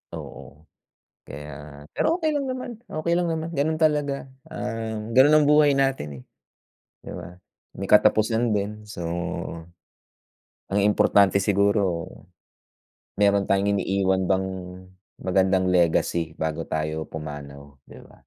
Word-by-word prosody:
Oo, 75 +3 -10 0.6
kaya, 75 0 -10
pero 325 - +1
okay 315 - +2
lang 290 -2 -1
naman, 255 -3 -5
okay 170 0 -1
lang 175 - +1
naman, 160 +1 -3
ganun 155 +1 -1
talaga, 145 -3 +1 0.2
ah, 115 -1 -4 0.2
ganun 130 +5 +5
ang 145 - +2
buhay 150 -1 +5
natin, 135 - -1
eh, - - -19 0.8
'di - - -9
ba? 90 +1 -10 0.3
May 95 - -6
katapusan 110 +2 +4
din. 105 +1 -3
So, 105 -4 -9 1.7
ang 100 +1 0
importante 100 -1 +4
siguro, 100 -3 +1 1.1
meron 100 -1 +4
tayong 100 +1 +1
iniiwan 95 -1 +1
bang 95 +1 +1 0.8
magandang 95 0 +2
legacy 85 -2 +1
bago 80 -2 -3
tayo 80 0 -3
pumanaw, 70 -2 -9
'di - - -13
ba? - - -18
100 Hz, 120 wpm, -24 LUFS, 85-135 Hz, 1.7 s, ganun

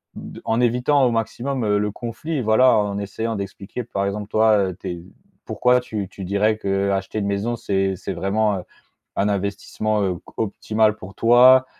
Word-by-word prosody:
de - - -9
en 115 +2 +1
évitant 125 +4 +3
au 120 - +2
maximum, 120 +3 -2
heu, 105 -1 +2
le 105 0 0
conflit, 130 +8 -4
voilà. 120 +3 +5
En 100 -1 0
essayant 110 +3 -3
d'expliquer, 100 +4 -6
par 100 -3 -2
exemple, 100 +1 -3
toi, 110 -1 +4
heu, 90 - -7
tu 95 - -5
es 85 -1 -6 0.4
pourquoi 125 0 +2
tu 105 -5 -5
tu 95 - -9
dirais 105 +3 +1
qu'acheter 100 0 -1
une 100 - -2
maison, 100 +4 -1
c'est 95 -3 -1
c'est 100 - -5
vraiment, 100 +1 0
heu, - - -8 0.5
un 100 - +1
investissement, 100 +2 -1
heu, 95 -2 0
q - - -12 0.2
optimal 110 0 +1
pour 95 -2 -11
toi 125 +3 +6
105 Hz, 185 wpm, -22 LUFS, 100-115 Hz, 0.5 s, toi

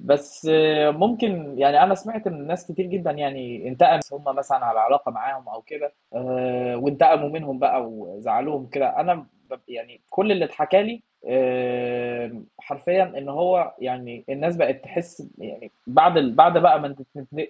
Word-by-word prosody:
بس 145 +2 -1 0.4
ممكن 190 - -1
يعني 140 +1 +6
أنا 195 +1 +6
سمعت 215 +2 -6
من 150 -6 -10
ناس 175 +2 -6
كتير 190 +2 -4
جدًا 180 -3 -3
يعني 135 -4 -6
انتقمت 130 +2 +3
هم 140 +1 -11
مثلًا 135 0 -2
على 115 -1 0
علاقة 145 +5 +2
معاهم 135 -1 -7
أو 110 - -11
كده 145 +5 -8 0.2
آآ، 125 -1 -3
وانتقموا 145 +3 +3
منهم 145 -4 -7
بقى 130 - +1
وزعّلوهم 125 +6 -4
كده 125 - -1
أنا 180 - +1
ما 145 -4 -15
ب - - -30
يعني 120 0 -13
كُلّ 200 +2 +1
اللي 185 -4 +1
اتحكى 185 +6 +2
لي 230 +2 -7 0.2
آآ، 125 -2 -2 0.2
حرفيًا 175 +7 0
إنه 140 0 -8
هو 175 +2 +1
يعني 125 -2 -8
الناس 155 +6 -3
بقِت 135 -5 -1
تحس 170 -1 -9
يعني - - -14 0.2
بعد 165 +7 +5
ال 130 -6 +1
بعد 170 +2 +7
بقى 170 -3 +6
ما 145 -1 -7 0.4
ال 155 - -4
145 Hz, 160 wpm, -22 LUFS, 125-175 Hz, 0.4 s, بعد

